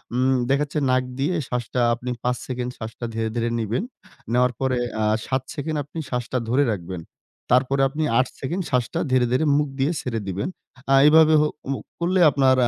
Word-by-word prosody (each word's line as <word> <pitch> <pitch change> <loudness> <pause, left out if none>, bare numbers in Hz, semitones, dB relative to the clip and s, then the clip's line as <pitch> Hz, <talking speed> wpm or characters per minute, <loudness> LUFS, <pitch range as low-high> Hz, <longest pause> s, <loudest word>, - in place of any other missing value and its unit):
উম 130 +1 +3
দেখাচ্ছে 145 +2 +1
নাক 130 0 +3 0.2
দিয়ে 155 +7 +1
শ্বাসটা 125 0 -2
আপনি 125 +2 -5
৫ 125 0 0
সেকেন্ড 125 -1 -3
শ্বাসটা 115 +1 -6
ধীরে, 110 0 -1
ধীরে, 115 0 0
নিবেন। 115 - -1 0.5
নেওয়ার 125 0 +3
পরে, 130 -1 +1 0.2
আ - - +2 0.2
৭ 130 -1 0
সেকেন্ড 155 +2 -3
আপনি 150 +4 -8
শ্বাসটা 125 -1 -2
ধরে 130 +4 +3
রাখবেন। 90 -2 -6 0.5
তারপরে 135 +2 +3
আপনি 150 +3 -2 0.2
৮ 130 - +2
সেকেন্ড 170 +8 -2
শ্বাসটা 125 +6 0
ধীরে, 130 -1 +4
ধীরে, 130 +5 +2
মুখ 150 0 +1
দিয়ে 140 +4 +2
ছেড়ে 115 -3 -3
দিবেন। 95 - -2 0.4
আ - - +7
এভাবে 160 +1 +6
হু 150 - +3 0.2
মু 135 - -1 0.2
করলে 180 +2 +1
আপনার 135 -2 +4
130 Hz, 180 wpm, -23 LUFS, 120-145 Hz, 0.5 s, আ